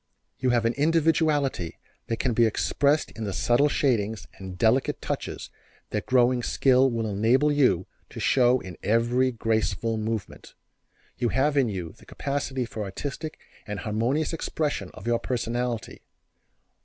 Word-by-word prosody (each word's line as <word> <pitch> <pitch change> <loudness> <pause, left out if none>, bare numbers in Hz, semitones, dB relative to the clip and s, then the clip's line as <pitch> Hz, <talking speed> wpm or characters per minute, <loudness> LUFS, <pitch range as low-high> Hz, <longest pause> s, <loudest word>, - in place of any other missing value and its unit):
You 130 - +1
have 120 -2 +2
an 115 - +2
individuality 150 - +1 0.3
that 115 - -1
can 125 0 0
be 115 0 +4
expressed 140 +7 +1
in 110 - -7
the 100 -2 -3
subtle 120 +9 +3
shadings 110 -7 0
and 95 -1 -8
delicate 115 +7 +2
touches - - -5 0.4
that - - -3
growing 125 -1 +3
skill 130 +2 +3
will 115 -2 -2
enable 115 +8 +2
you 125 -12 +3 0.2
to - - -9
show 125 -1 +4
in 90 -3 -9
every 120 +4 +2
graceful 115 0 -1
movement. 110 -2 -5 0.6
You 120 - +1
have 140 +6 +1
in 135 -5 +3
you 90 -5 -4
the - - -18
capacity 140 -2 -2
for 110 -2 -5
artistic 145 - -5 0.3
and 105 -3 -4
harmonious 120 - 0
expression 155 -2 -2
of - - -11
your 120 0 +1
personality. 120 -1 -3
120 Hz, 145 wpm, -26 LUFS, 110-140 Hz, 0.6 s, be